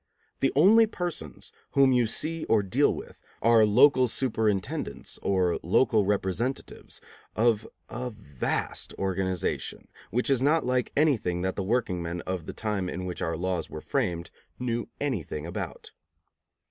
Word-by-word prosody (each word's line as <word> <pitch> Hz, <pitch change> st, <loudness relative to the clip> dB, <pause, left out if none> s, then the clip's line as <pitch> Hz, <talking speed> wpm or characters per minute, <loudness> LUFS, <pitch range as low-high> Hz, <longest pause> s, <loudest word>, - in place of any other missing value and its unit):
The 135 Hz, -, +2 dB
only 215 Hz, +9 st, +6 dB
persons 175 Hz, -, -5 dB, 0.2 s
whom 135 Hz, -1 st, +5 dB
you 125 Hz, -2 st, +3 dB
see 155 Hz, +8 st, -2 dB
or 110 Hz, -2 st, +3 dB
deal 125 Hz, +10 st, +3 dB
with -, -, -8 dB, 0.2 s
are 115 Hz, -1 st, +5 dB
local 130 Hz, +4 st, +5 dB
superintendents 110 Hz, -6 st, -2 dB
or 90 Hz, -3 st, +1 dB
local 105 Hz, +3 st, +3 dB
representatives 105 Hz, +6 st, -2 dB, 0.3 s
of 110 Hz, -1 st, +2 dB, 0.2 s
a 125 Hz, 0 st, -4 dB
vast 90 Hz, -, -3 dB
organization, 95 Hz, -2 st, -2 dB, 0.2 s
which 125 Hz, +4 st, +1 dB
is 130 Hz, -2 st, +3 dB
not 155 Hz, +4 st, +3 dB
like 125 Hz, -1 st, 0 dB
anything 115 Hz, -, +2 dB
that 95 Hz, 0 st, -1 dB
the -, -, -2 dB
workingmen 90 Hz, -6 st, -1 dB
of 90 Hz, -3 st, -4 dB
the -, -, -3 dB
time 105 Hz, -4 st, -2 dB
in 90 Hz, +1 st, -4 dB
which 90 Hz, -1 st, -5 dB
our 80 Hz, 0 st, -1 dB
laws 90 Hz, -1 st, -2 dB
were 75 Hz, -, -6 dB
framed 90 Hz, -, -2 dB, 0.3 s
knew 120 Hz, -2 st, -2 dB
anything 95 Hz, -, -3 dB
about. 85 Hz, -, -6 dB
110 Hz, 140 wpm, -27 LUFS, 90-130 Hz, 0.3 s, only